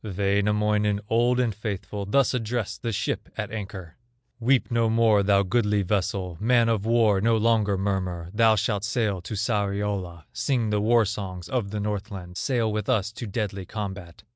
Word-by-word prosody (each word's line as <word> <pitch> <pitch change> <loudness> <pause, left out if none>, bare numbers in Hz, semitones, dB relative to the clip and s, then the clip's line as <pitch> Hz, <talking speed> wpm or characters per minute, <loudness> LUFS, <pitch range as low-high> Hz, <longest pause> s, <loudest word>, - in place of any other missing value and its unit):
Wainamoinen, 105 +1 +1
old 120 +2 +3
and 120 -3 +1
faithful, 100 -1 -5
Thus 135 +6 +3
addressed 115 -3 -2
the 115 - -2
ship 95 -3 -2
at - - -3
anchor: 95 -5 -7 0.4
"Weep 125 +2 +2
no 115 -1 +2
more, 110 -2 +4
thou 100 0 +3
goodly 105 0 +1
vessel, 95 -2 -1
Man 115 +1 +3
of 110 -2 0
war, 110 -4 +3
no 115 +1 +3
longer 110 -3 +2
murmur; 95 -3 -2
Thou 110 0 +5
shalt 105 -1 -1
sail 105 -4 0
to 90 +5 -6
Sariola, 100 -5 -2
Sing 120 -6 0
the 105 -1 +1
war 115 +1 +4
songs 95 -3 -5
of 120 -6 -2
the 105 +1 -4
Northland, 100 -3 -4
Sail 115 +1 0
with 105 -1 -3
us 105 0 +1
to 110 +1 -7
deadly 100 -2 -3
combat. 95 -5 -6
105 Hz, 165 wpm, -25 LUFS, 100-115 Hz, 0.4 s, Thou